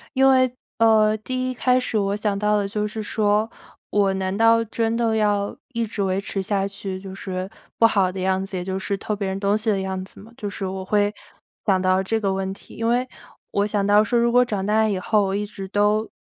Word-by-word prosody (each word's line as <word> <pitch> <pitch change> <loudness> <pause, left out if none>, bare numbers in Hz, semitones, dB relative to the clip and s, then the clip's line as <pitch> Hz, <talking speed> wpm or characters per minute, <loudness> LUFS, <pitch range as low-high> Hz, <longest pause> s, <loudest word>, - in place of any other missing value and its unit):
因 265 +1 +5
为， 255 -1 +4 0.3
呃， 220 -1 +4
第 255 +3 -3
一 - - -2
开 250 +1 +2
始 250 -3 -1
我 200 -1 0
想 210 -1 -1
到 210 +1 +2
的 200 -1 0
就 210 +1 -2
是 215 +1 -5
说， 210 +1 +1 0.4
我 200 -2 +2
难 190 0 -2
道 225 +1 +4
真 225 +1 -1
的 230 -1 +1
要 205 -2 +1 0.2
一 230 -1 0
直 210 -1 -5
维 190 0 0
持 200 -1 -3
下 195 0 0
去 195 -1 -6
就 190 0 -9
是 190 -1 -5 0.3
不 230 - +5
好 195 -5 +3
的 190 - -6
样 190 +1 0
子， 195 -1 -6
也 180 - -3
就 190 +1 -3
是 200 +1 -2
偷 210 +2 -3
别 200 -1 -3
人 190 0 -3
东 200 +1 +2
西 215 +1 -2
的 200 -2 +1
样 190 -1 -3
子 - - -17
吗？ 220 +3 -14
就 210 -5 -4
是 200 -1 -4
我 190 0 -4
会 205 +1 +1 0.5
想 190 -3 +3
到 185 0 +3
这 220 +4 -1
个 195 -3 0
问 190 0 -2
题， - - -15
因 230 - -2
为 245 +2 +1 0.4
我 200 +1 +1
想 205 -1 0
到 205 +1 +5
说 235 +3 0
如 235 0 +2
果 250 +1 +5
长 205 -5 -2
大 220 +1 +3
以 200 -3 0
后， 210 +3 +2
我 190 0 -1
一 205 +1 -1
直 200 -2 -8
都 210 +2 +1
205 Hz, 260 characters per minute, -23 LUFS, 195-220 Hz, 0.5 s, 因